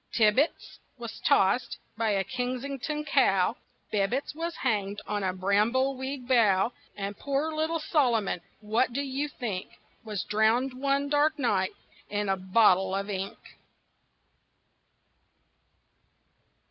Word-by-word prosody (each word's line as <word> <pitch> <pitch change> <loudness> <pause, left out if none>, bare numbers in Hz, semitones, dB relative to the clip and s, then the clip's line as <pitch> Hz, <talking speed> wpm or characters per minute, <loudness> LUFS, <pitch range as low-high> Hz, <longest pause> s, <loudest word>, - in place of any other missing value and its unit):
Tibbitts 230 +7 +2 0.2
was 235 -2 -7
tossed 195 +6 +2 0.2
by 220 0 0
a 195 -2 +1
Kensington 265 +5 -3
cow, 245 -10 +3 0.4
Bibbitts 215 +9 0
was 330 +2 -4
hanged 205 -5 -1
on 210 -1 -2
a 190 -1 0
brambleweed 255 +8 0
bough, 225 -3 +3 0.2
And 200 0 -4
poor 285 +6 -1
little 315 +2 0
Solomon 240 - +1 0.2
what 220 +4 +1
do 275 - 0
you 275 +2 -2
think? 220 -10 -4 0.4
Was 210 -5 -3
drowned 220 +6 +2
one 275 +2 0
dark 295 +2 +2
night 195 -9 +1 0.4
in 205 -1 -1
a 195 - +3
bottle 190 0 +3
of 200 +1 -3
ink. 195 0 -4
235 Hz, 115 wpm, -28 LUFS, 200-275 Hz, 0.4 s, cow